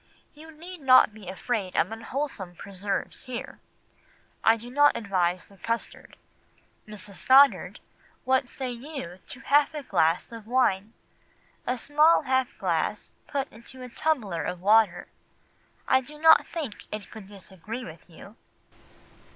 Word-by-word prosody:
You 310 Hz, +2 st, -14 dB
need 335 Hz, +2 st, -11 dB
not 255 Hz, -5 st, +6 dB
be 210 Hz, -4 st, -10 dB
afraid 195 Hz, 0 st, -3 dB
of -, -, +1 dB
unwholesome 225 Hz, -5 st, -5 dB
preserves 195 Hz, +6 st, -4 dB
here. 250 Hz, -2 st, -7 dB, 0.8 s
I 225 Hz, +1 st, +5 dB
do 240 Hz, +2 st, -9 dB
not 290 Hz, +2 st, +4 dB
advise 185 Hz, -4 st, -1 dB
the 200 Hz, -, -20 dB
custard. 230 Hz, +6 st, -5 dB, 0.7 s
Mrs. 205 Hz, -2 st, -7 dB
Goddard, 275 Hz, +2 st, +5 dB, 0.4 s
what 260 Hz, -1 st, +1 dB
say 260 Hz, -2 st, -5 dB
you 240 Hz, -, -8 dB
to -, -, -8 dB
half 290 Hz, +3 st, +3 dB
a 295 Hz, -, -5 dB
glass 170 Hz, -5 st, +1 dB
of 225 Hz, -2 st, -10 dB
wine? 225 Hz, -4 st, +1 dB, 0.7 s
A 250 Hz, +1 st, 0 dB
small 300 Hz, +6 st, +4 dB
half 260 Hz, -1 st, +1 dB
glass -, -, -1 dB, 0.2 s
put 275 Hz, -2 st, -2 dB
into 235 Hz, +3 st, -12 dB
a 250 Hz, -, -8 dB
tumbler 235 Hz, -, -1 dB
of 180 Hz, +2 st, -4 dB
water? 200 Hz, -2 st, +3 dB, 0.8 s
I 260 Hz, -, +4 dB
do 300 Hz, +4 st, -12 dB
not 320 Hz, +1 st, +6 dB
think 295 Hz, -11 st, -5 dB
it 210 Hz, -1 st, -7 dB
could 215 Hz, -4 st, -10 dB
disagree 200 Hz, +4 st, -8 dB
with 165 Hz, +2 st, -12 dB
you. 195 Hz, +6 st, -14 dB
230 Hz, 140 wpm, -26 LUFS, 195-270 Hz, 0.8 s, not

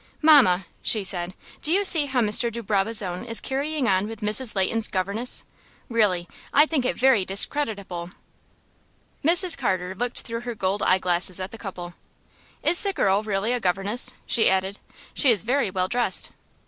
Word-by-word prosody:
"Mamma," 255 Hz, -, +4 dB, 0.2 s
she 215 Hz, -3 st, 0 dB
said, 180 Hz, -1 st, -1 dB, 0.3 s
"do 305 Hz, -, +1 dB
you 400 Hz, +3 st, +1 dB
see 315 Hz, -6 st, +7 dB
how 260 Hz, -2 st, -1 dB
Mr. 225 Hz, +2 st, +1 dB
de 235 Hz, +1 st, -7 dB
Barbazon 200 Hz, -2 st, -2 dB
is 230 Hz, -1 st, +1 dB
carrying 280 Hz, 0 st, -3 dB
on 190 Hz, 0 st, 0 dB
with 225 Hz, -1 st, -10 dB
Mrs. 215 Hz, +3 st, +2 dB
Leighton's 215 Hz, +4 st, 0 dB
governess? 200 Hz, +6 st, -1 dB, 0.5 s
Really, 200 Hz, -7 st, 0 dB, 0.2 s
I 295 Hz, -, +4 dB
think 300 Hz, -5 st, -3 dB
it -, -, -2 dB
very 255 Hz, -6 st, +2 dB
discreditable." 195 Hz, -4 st, -1 dB, 1.1 s
Mrs. 345 Hz, +3 st, +3 dB
Carter 185 Hz, -7 st, -3 dB
looked 245 Hz, +5 st, -4 dB
through 230 Hz, 0 st, -7 dB
her 240 Hz, -1 st, -7 dB
gold 195 Hz, 0 st, -3 dB
eye 185 Hz, -, +2 dB
glasses 180 Hz, 0 st, -1 dB
at 185 Hz, +1 st, -7 dB
the 225 Hz, -, -11 dB
couple. 175 Hz, -4 st, -9 dB, 0.7 s
"Is 330 Hz, +4 st, +5 dB
the 400 Hz, -1 st, -3 dB
girl 195 Hz, -, 0 dB
really 215 Hz, +2 st, -3 dB
a 250 Hz, -, -2 dB
governess?" 195 Hz, +4 st, +3 dB
she 230 Hz, -, +2 dB
added. 190 Hz, +1 st, -2 dB, 0.3 s
"She 280 Hz, -, +3 dB
is 215 Hz, -7 st, +3 dB
very 255 Hz, -1 st, -1 dB
well 185 Hz, 0 st, -2 dB
dressed." 240 Hz, +4 st, +2 dB
215 Hz, 170 wpm, -22 LUFS, 190-250 Hz, 1.1 s, see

